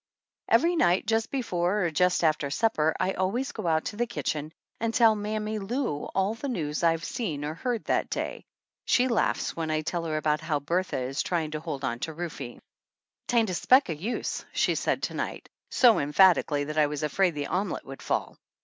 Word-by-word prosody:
Every 335 +10 +4
night 180 - +3
just 225 +1 +1
before 190 -7 0
or 170 - 0
just 180 +3 +2
after 155 -3 +2
supper 160 -2 +1
I 190 - +1
always 220 +9 -1
go - - -5
out 160 -1 +1
to - - -4
the 240 +1 0
kitchen 155 -9 -3 0.3
and 230 0 -1
tell 230 -2 +6
Mammy 215 +1 -3
Lou 200 - -2
all 195 +2 +2
the 250 +5 -5
news 155 - -2
I've 165 0 +2
seen 165 - -3
or 150 - -3
heard 235 +7 -3
that - - 0
day. - - -3 0.4
She 250 +1 +3
laughs 235 -3 0
when 160 -1 -3
I 155 0 0
tell 165 +2 -3
her 155 -1 -1
about 155 0 +1
how 155 -2 -1
Bertha 175 +6 -1
is 130 +2 -2
try 175 -3 0
ing 155 - -6
to 155 - -3
hold 140 -3 -5
on 120 -2 -2
to 160 - -4
Rufe. 150 -7 -6 0.3
" - - -55
'Tain't 230 -5 +2
a - - -3
speck 255 - +4
o' - - 0
use," 200 +11 -3
she - - +2
said - - -1
to - - -2
night - - -4 0.2
so 240 -4 +5
emphatically 150 -1 +4
that 150 +2 -2
I 150 - +5
was 150 0 -4
afraid 175 +3 +1
the 145 -1 -2
omelette 190 +4 -2
would 135 0 -9
fall. - - -2
175 Hz, 210 wpm, -27 LUFS, 155-220 Hz, 0.4 s, tell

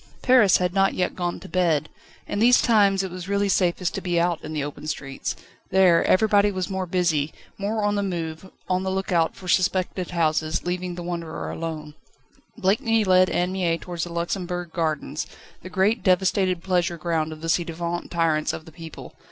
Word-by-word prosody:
Paris 245 -7 +6
had 180 0 -1
not 195 0 +2
yet 180 - 0
gone 175 -1 -2
to - - -11
bed. 165 -4 +1 0.4
In 205 - -2
these 245 +3 +6
times 200 -4 +3
it 190 - -5
was 180 +1 -7
really 200 0 +1
safest 180 -2 +1
to 195 - -3
be 175 -2 0
out 170 -1 0
in 155 - -6
the 150 -2 -2
open 145 +1 -7
streets. 135 -2 -4 0.3
There, 185 -3 +5
everybody 205 0 +4
was 185 -1 -3
more 190 -1 -2
busy, 165 -5 +1 0.3
more 210 +2 -1
on 205 0 +2
the 205 - 0
move, 170 -2 -4 0.2
on 185 0 +1
the 190 - -2
lookout 190 -3 0
for 185 - -11
suspected 185 0 +1
houses, 160 -1 0
leaving 180 0 -3
the 175 - -6
wanderer 170 -2 -4
alone. 155 -2 -5 0.6
Blakeney 225 +2 +2
led 185 -1 +4
Anne 180 +1 0
Mie 175 -3 0
towards 175 -1 -5
the 175 - -9
Luxembourg 175 0 -3
Gardens, 155 -3 -2 0.3
the 185 - -9
great 195 +5 +1
devastated 185 -1 +2
pleasure 175 -2 0
ground 160 -1 -1
of 155 0 -9
the 165 - -4
ci 170 +1 +2
devant 170 +1 -4
tyrants 165 -3 +1
of 160 - -7
the 160 - -13
people. 165 -1 -10
180 Hz, 190 wpm, -24 LUFS, 165-190 Hz, 0.6 s, Paris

